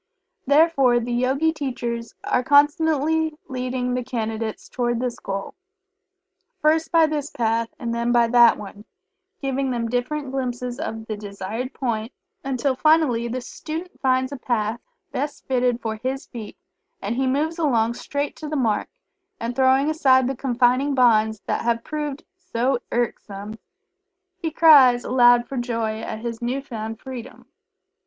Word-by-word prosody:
Therefore 280 -4 +4
the 240 +1 -3
Yogi 270 +6 +1
teachers 240 -5 -4
are 250 - +1
constantly 305 +2 +3
leading 250 -1 -2
the 250 0 -1
Candidates 225 -3 -4
toward 240 -2 -1
this 245 -1 -3
goal. 195 0 -5 1.1
First 315 +1 +2
by 330 -2 +6
this 300 -2 -2
path, 230 -2 0
and 235 -1 -3
then 235 +1 0
by 240 -1 +4
that 240 -1 +6
one, 205 0 -10 0.6
giving 270 0 -1
them 235 -2 -1
different 260 +3 -2
glimpses 250 -1 -3
of 225 -9 -5
the 220 - -4
desired 210 +5 -6
point, 230 -2 -2 0.3
until 270 0 0
finally 295 -6 +3
the 250 +2 -3
student 325 +7 -7
finds 260 0 +1
a 280 - -5
path 230 -2 -1 0.3
best 285 +2 -4
fitted 250 -2 +1
for 220 -2 -4
his 260 +4 -3
feet, 225 -4 -9 0.4
and 210 +4 -3
he 265 +1 0
moves 310 +6 0
along 235 -7 +2
straight 285 +4 -3
to 305 - -6
the 305 - -3
mark, 225 -7 0 0.5
and 235 +1 -3
throwing 265 +2 +4
aside 265 -5 +4
the 270 - -2
confining 255 +2 +2
bonds 220 -4 +3
that - - -1
have 230 0 0
proved 295 -2 -4 0.2
so 260 -8 0
irksome, 215 -3 -3 0.8
he 330 - -2
cries 280 -7 +6
aloud 245 -1 +5
for 270 - -5
joy 230 -3 -2
at 220 - -5
his 235 -1 -5
new 245 +3 -1
found 225 -5 -6
Freedom. 255 -2 -9
250 Hz, 150 wpm, -23 LUFS, 230-280 Hz, 1.1 s, by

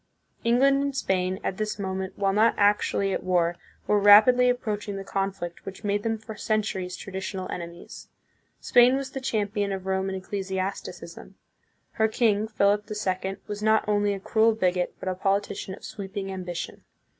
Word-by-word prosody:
England 270 +4 +4
and 280 -1 -2
Spain, 185 -3 0
at 190 - -2
this 215 -1 -2
moment, 190 -1 -4
while 195 -1 +1
not 220 +3 +4
actually 205 -1 +2
at - - -3
war, 175 -2 +1 0.3
were 210 - +3
rapidly 220 +5 +7
approaching 210 -4 -2
the 195 - -5
conflict 195 -3 -3
which 195 +3 -9
made 205 0 0
them 225 +1 -1
for 220 0 -9
centuries 200 -4 -2
traditional 190 0 -5
enemies. 170 0 -8 0.5
Spain 245 +1 +5
was 270 -1 -3
the 270 - -5
champion 205 -4 -1
of 190 -1 -4
Roman 190 0 -1
ecclesiasticism. 190 0 -5 0.6
Her 220 -1 +2
king, 220 -2 +1
Philip 210 -1 +1
the 210 - -5
Second, 190 -1 -2
was 205 0 -6
not 220 0 +3
only 205 -1 +2
a - - -6
cruel 220 +3 +2
bigot, 180 -3 0
but - - -7
a 185 - +1
politician 195 0 -1
of - - -13
sweeping 195 -2 -6
ambition. 180 -2 -6
200 Hz, 165 wpm, -26 LUFS, 190-215 Hz, 0.6 s, rapidly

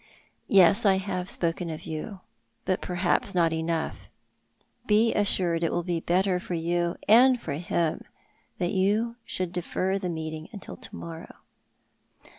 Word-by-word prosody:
" - - -44
Yes, 195 +3 +6
I 195 -2 +5
have 185 -1 -3
spoken 170 0 -1
of 160 +1 -6
you; 165 +5 -6 0.4
but 185 - 0
perhaps 180 +2 0
not 165 -2 +3
enough. 160 0 -3 0.8
Be 220 +2 +4
assured 180 -5 +1
it 165 - +1
will 175 - -1
be 175 -1 -1
better 180 +2 +1
for 180 - -4
you 170 +1 0
and 245 +4 +6
for 145 - -4
him 170 0 -1 0.6
that 175 - -1
you 210 +5 +1
should 185 -2 -2
defer 185 +2 -1
the 185 -2 -3
meeting 160 -1 -5
till - - -9
to 225 -4 -9
morrow." 165 -2 -8
180 Hz, 150 wpm, -27 LUFS, 165-195 Hz, 0.8 s, Yes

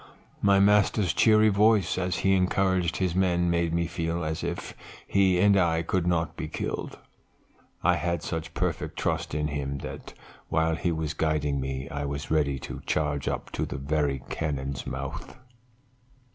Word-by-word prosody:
My 100 -1 +5
master's 105 -2 +3
cheery 110 -1 +5
voice, 105 -3 +3
as 90 0 -1
he 95 - +5
encouraged 95 -2 +1
his 90 -3 0
men, 90 -2 +2
made 85 -1 +1
me 85 +1 +1
feel 85 +1 -2
as 80 +1 -3
if 85 0 -4 0.3
he 95 -2 +3
and 100 +1 +5
I 85 -3 +2
could 90 +1 0
not 80 -2 0
be 80 - -4
killed. 75 - -4 0.9
I - - +4
had 85 -2 -2
such 80 -1 -4
perfect - - -2
trust - - -1
in 75 0 0
him 70 -1 -3
that - - -8 0.3
while 80 +1 +2
he 85 +1 -1
was 80 -2 -2
guiding 75 -3 0
me 65 0 -4
I 70 0 -3
was 70 +1 -4
ready 70 -3 +2
to - - -7
charge 75 -2 0
up - - -3
to - - -2
the - - -4
very 70 -1 -1
cannon's 70 -3 -3
mouth. 70 - -6
80 Hz, 165 wpm, -27 LUFS, 75-90 Hz, 0.9 s, My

